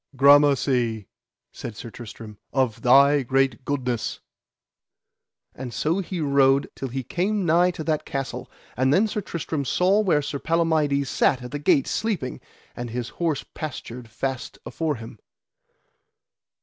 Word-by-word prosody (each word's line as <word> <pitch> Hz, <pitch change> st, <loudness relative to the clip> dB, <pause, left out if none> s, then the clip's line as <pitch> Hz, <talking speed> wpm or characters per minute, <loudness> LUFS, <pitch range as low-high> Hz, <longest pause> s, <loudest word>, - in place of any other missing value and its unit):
Gramercy, 135 Hz, -6 st, +4 dB, 0.4 s
said 115 Hz, -, -7 dB
Sir 115 Hz, -, -8 dB
Tristram, 110 Hz, -2 st, -10 dB
of 130 Hz, -5 st, 0 dB
thy 140 Hz, +3 st, +6 dB
great 135 Hz, -1 st, +1 dB
goodness. 125 Hz, -4 st, -2 dB, 1.3 s
And 125 Hz, -1 st, -7 dB
so 160 Hz, +9 st, 0 dB
he 185 Hz, -1 st, -4 dB
rode 140 Hz, -2 st, +3 dB
till 135 Hz, -, -5 dB
he 130 Hz, +1 st, -4 dB
came 195 Hz, -, -1 dB
nigh 170 Hz, +2 st, +4 dB
to 165 Hz, -3 st, -5 dB
that 155 Hz, -1 st, 0 dB
castle; 135 Hz, -2 st, -5 dB, 0.3 s
and 130 Hz, +2 st, +2 dB
then 200 Hz, +9 st, +4 dB
Sir 210 Hz, 0 st, -3 dB
Tristram 160 Hz, -5 st, -3 dB
saw 185 Hz, +9 st, +2 dB
where 175 Hz, -8 st, +2 dB
Sir 140 Hz, 0 st, -4 dB
Palamides 155 Hz, -4 st, +1 dB
sat 130 Hz, 0 st, +1 dB
at 125 Hz, -, -8 dB
the 145 Hz, -, -4 dB
gate 140 Hz, -2 st, +3 dB
sleeping, 185 Hz, -, -2 dB, 0.3 s
and 120 Hz, 0 st, -5 dB
his 120 Hz, +1 st, -4 dB
horse 160 Hz, -5 st, 0 dB
pastured 125 Hz, -5 st, -7 dB
fast 130 Hz, 0 st, -4 dB
afore 160 Hz, -3 st, -2 dB
him. 115 Hz, -1 st, -10 dB
140 Hz, 140 wpm, -24 LUFS, 125-160 Hz, 1.3 s, thy